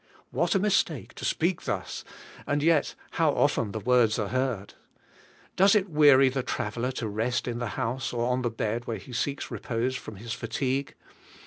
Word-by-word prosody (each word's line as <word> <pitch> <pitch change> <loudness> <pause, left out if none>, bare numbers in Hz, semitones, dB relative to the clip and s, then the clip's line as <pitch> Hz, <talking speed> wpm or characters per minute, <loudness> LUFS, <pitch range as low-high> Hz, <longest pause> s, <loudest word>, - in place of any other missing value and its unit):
What 165 +8 +1
a - - +4
mistake 190 - 0
to - - -7
speak 170 +2 0
thus, - - -3 0.4
and 145 0 0
yet 160 -3 +3 0.2
how 165 -2 +2
often 115 -7 +1
the 110 - -3
words 120 -1 +3
are 105 -4 -1
heard! 130 -5 -1 0.8
Does 195 +3 +5
it 195 -3 +1
weary 145 -3 +7
the 135 +1 -1
traveller 120 0 -2
to 120 -3 -3
rest 115 +5 -1
in 120 -1 -2
the 120 - -2
house 120 +1 -2
or 120 -1 -1
on 125 +1 +1
the 120 - 0
bed 115 +1 -3
where 115 - -2
he 125 - -11
seeks 140 +4 -2
repose 125 +2 -2
from 110 - -7
his 115 +4 -6
fatigue? 135 +3 -2
125 Hz, 185 wpm, -27 LUFS, 115-145 Hz, 0.8 s, weary